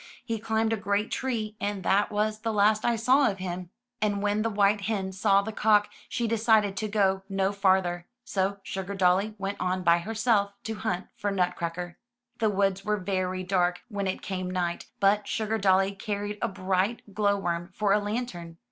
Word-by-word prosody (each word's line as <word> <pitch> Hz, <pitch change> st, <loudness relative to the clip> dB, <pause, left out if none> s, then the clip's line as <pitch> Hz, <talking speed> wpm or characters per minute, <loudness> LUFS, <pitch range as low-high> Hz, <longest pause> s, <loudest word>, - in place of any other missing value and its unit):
"He 230 Hz, -3 st, -2 dB
climbed 220 Hz, +1 st, 0 dB
a -, -, 0 dB
great 205 Hz, +1 st, -1 dB
tree, 225 Hz, -5 st, -2 dB
and 200 Hz, -2 st, -2 dB
that 200 Hz, +4 st, +2 dB
was 215 Hz, +1 st, 0 dB
the 225 Hz, +1 st, -2 dB
last 215 Hz, +1 st, +3 dB
I 240 Hz, -, +2 dB
saw 255 Hz, +5 st, +4 dB
of 195 Hz, -, -4 dB
him." 180 Hz, -1 st, -5 dB, 0.3 s
And 205 Hz, -1 st, 0 dB
when 205 Hz, +1 st, +1 dB
the 225 Hz, -, 0 dB
white 205 Hz, 0 st, +2 dB
hen 195 Hz, -2 st, -2 dB
saw 195 Hz, +1 st, +3 dB
the 220 Hz, -, -4 dB
cock, 210 Hz, -1 st, +3 dB, 0.2 s
she 235 Hz, -, -1 dB
decided 220 Hz, -3 st, +3 dB
to 215 Hz, -, -1 dB
go 195 Hz, -2 st, +2 dB
no 195 Hz, 0 st, +1 dB
farther; 190 Hz, -3 st, +1 dB, 0.2 s
so 195 Hz, -1 st, -1 dB
Sugardolly 195 Hz, +2 st, 0 dB
went 200 Hz, 0 st, -3 dB
on 185 Hz, 0 st, 0 dB
by 170 Hz, 0 st, +5 dB
herself 215 Hz, 0 st, +1 dB
to 225 Hz, -, -3 dB
hunt 205 Hz, -4 st, -2 dB
for 205 Hz, -, -2 dB
Nutcracker. 175 Hz, -2 st, -2 dB, 0.4 s
The 220 Hz, -, +3 dB
woods 195 Hz, -1 st, +1 dB
were 210 Hz, 0 st, 0 dB
very 185 Hz, -1 st, -2 dB
dark 180 Hz, -1 st, +1 dB
when 200 Hz, -3 st, -2 dB
it 190 Hz, -, -3 dB
came 185 Hz, -1 st, -3 dB
night, 175 Hz, -2 st, -2 dB
but 205 Hz, +1 st, +3 dB
Sugardolly 195 Hz, -3 st, +2 dB
carried 205 Hz, 0 st, -3 dB
a 235 Hz, -, +1 dB
bright 195 Hz, +2 st, -1 dB
glow 200 Hz, -1 st, +2 dB
worm 175 Hz, -2 st, -2 dB
for 200 Hz, +1 st, +1 dB
a 210 Hz, -, +4 dB
lantern. 205 Hz, -6 st, -4 dB
200 Hz, 185 wpm, -27 LUFS, 185-215 Hz, 0.4 s, by